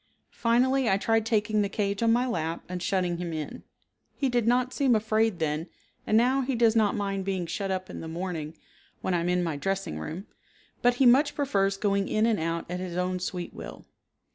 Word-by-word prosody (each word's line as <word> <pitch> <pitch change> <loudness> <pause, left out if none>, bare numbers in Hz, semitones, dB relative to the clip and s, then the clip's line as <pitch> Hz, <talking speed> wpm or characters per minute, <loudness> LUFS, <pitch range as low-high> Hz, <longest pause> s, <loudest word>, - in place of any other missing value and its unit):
Finally 250 +2 +2
I 195 - +3
tried 225 +2 +1
taking 215 -1 +1
the 200 - 0
cage 200 0 -1
on 230 -1 +4
my 245 +2 +3
lap 165 -8 -2
and 180 0 -5
shutting 180 -2 0
him 175 -1 -4
in; 155 -2 -5 0.5
he 275 - 0
did 240 -2 +1
not 250 +1 +2
seem 265 -4 +3
afraid 220 -1 +1
then 160 0 -1 0.4
and 215 - +4
now 255 +4 +3
he 265 0 -1
does 230 -1 +3
not 215 -2 +3
mind 195 -2 -2
being 190 -2 -2
shut 195 +3 -3
up 185 -1 -2
in - - -8
the 165 - -6
morning 165 -2 -5 0.4
when 185 - -1
I 175 - +2
am 170 +1 -1
in 180 0 +2
my 165 -4 -2
dressing 195 - -2
room, 165 - -6 0.6
but 245 0 +4
he 265 - +3
much 275 +5 +5
prefers 195 -9 +1
going 200 -1 +1
in 215 +1 +2
and 225 -3 +2
out 165 +1 -2
at 180 +1 -4
his 180 -1 -5
own 180 0 -1
sweet 180 -1 -4
will. - - -9
200 Hz, 215 wpm, -27 LUFS, 180-230 Hz, 0.6 s, much